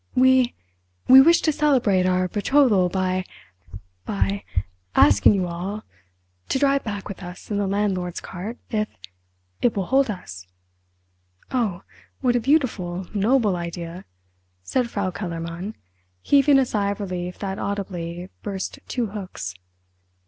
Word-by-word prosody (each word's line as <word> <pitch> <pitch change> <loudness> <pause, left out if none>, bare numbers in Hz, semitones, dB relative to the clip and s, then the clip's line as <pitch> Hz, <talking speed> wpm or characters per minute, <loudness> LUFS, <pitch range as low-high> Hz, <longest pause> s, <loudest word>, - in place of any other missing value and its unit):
"We—we 245 - +4
wish 335 +5 +5
to 315 - +2
celebrate 255 -11 +2
our 185 0 +2
betrothal 205 -2 +3
by—by—asking 95 - 0
you 185 -2 0
all 185 +5 -5 0.7
to - - +1
drive 275 0 +2
back 205 -3 -5
with 200 - -8
us 180 +3 -9
in 205 - 0
the 200 - 0
landlord's 190 -3 -1
cart—if—it 95 - -5
will 195 - 0
hold 270 +2 +3
us!" 95 - -7 1.0
"Oh, 210 -8 -1 0.4
what 250 -2 +2
a - - +3
beautiful, 220 - 0
noble 215 0 +2
idea!" 170 +1 -6 0.6
said 240 - 0
Frau 200 -4 -2
Kellermann, 170 +2 -5 0.5
heaving 280 0 +5
a 265 - +4
sigh 205 -4 0
of 200 - -3
relief 180 -2 -4
that 195 -1 -4
audibly 180 -3 -4
burst 195 -2 -5
two 245 -2 -1
hooks. 195 - -6
190 Hz, 120 wpm, -23 LUFS, 170-225 Hz, 1.0 s, wish